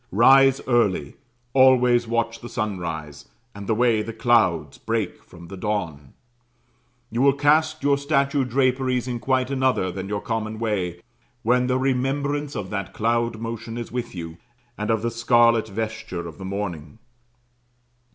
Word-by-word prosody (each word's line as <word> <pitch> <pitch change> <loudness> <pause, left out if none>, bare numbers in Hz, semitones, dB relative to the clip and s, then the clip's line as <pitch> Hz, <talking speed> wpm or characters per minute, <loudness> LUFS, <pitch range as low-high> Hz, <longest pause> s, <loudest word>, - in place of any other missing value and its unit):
Rise 135 +5 +6
early, 105 - +1 0.4
always 125 -2 +5
watch 115 0 -1
the 120 - -8
sunrise, 80 - -4 0.3
and 100 -1 -9
the 110 - +1
way 115 -2 +3
the 110 +2 -5
clouds 110 - +1
break - - -2
from 85 -1 -14
the 95 - -8
dawn; 90 -9 -4 1.0
you 115 +2 -1
will 140 0 +5
cast 155 +2 +2
your 140 0 +3
statue 140 -1 +1
draperies 130 0 0
in 120 -1 -3
quite 130 +2 0
another 130 -8 +1
than 95 +1 -6
your 105 0 -1
common 110 -1 -3
way, 95 -6 -2 0.4
when 125 +2 +2
the 125 0 +1
remembrance 140 +2 -1
of 105 -3 -5
that 100 -3 -4
cloud 115 0 0
motion 115 0 -5
is 120 - -6
with 125 -4 -4
you, 85 -1 -7 0.4
and 105 +1 -4
of 110 -1 +1
the 115 - 0
scarlet 115 -1 +3
vesture 110 -5 -5
of 80 - -11
the 95 - -7
morning. 95 -4 -5
115 Hz, 150 wpm, -23 LUFS, 100-130 Hz, 1.0 s, Rise